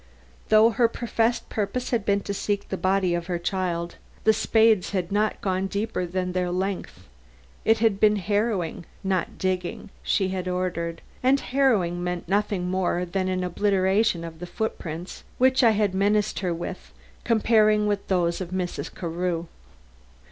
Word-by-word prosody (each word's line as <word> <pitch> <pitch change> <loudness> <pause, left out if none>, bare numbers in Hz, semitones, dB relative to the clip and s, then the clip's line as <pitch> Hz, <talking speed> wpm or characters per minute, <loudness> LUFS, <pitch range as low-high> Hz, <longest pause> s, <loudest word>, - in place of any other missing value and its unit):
Though 220 +2 +6
her 230 +2 +3
professed 230 0 -1
purpose 225 +4 -3
had 230 -4 0
been 200 0 +2
to 200 - -4
seek 200 0 -2
the - - -1
body 185 -1 +1
of 170 0 -2
her 175 -2 -1
child, 175 -1 -2 0.3
the 220 - +5
spades 220 -2 +3
had 185 -2 -1
not 210 +2 0
gone 190 0 0
deeper 200 -2 -2
than 180 +1 -2
their 180 0 -1
length. 190 +2 -3 0.6
It 225 0 +5
had 220 -3 +2
been 210 0 +5
harrowing, 205 -4 -1 0.2
not 190 -2 -1
digging, 185 +2 -2
she 190 -3 +1
had 185 -1 -3
ordered, 170 -2 -2 0.2
and 265 +2 +4
harrowing 210 -12 +1
meant 180 -1 -3
nothing 200 -1 0
more 180 -1 0
than 185 +1 -2
an 185 -1 -1
obliteration 190 0 +1
of 165 -1 -8
the 175 - -6
footprints 175 -5 -5
which 260 +1 +4
I 235 - +7
had 205 -3 +1
menaced 205 +2 +1
her 185 -2 -1
with 165 - -6 0.3
comparing 215 -2 +3
with 205 -1 -1
those 175 -2 +1
of 180 - -4
Mrs. 185 -1 -3
Carew. 170 0 -2
190 Hz, 160 wpm, -25 LUFS, 180-215 Hz, 0.6 s, I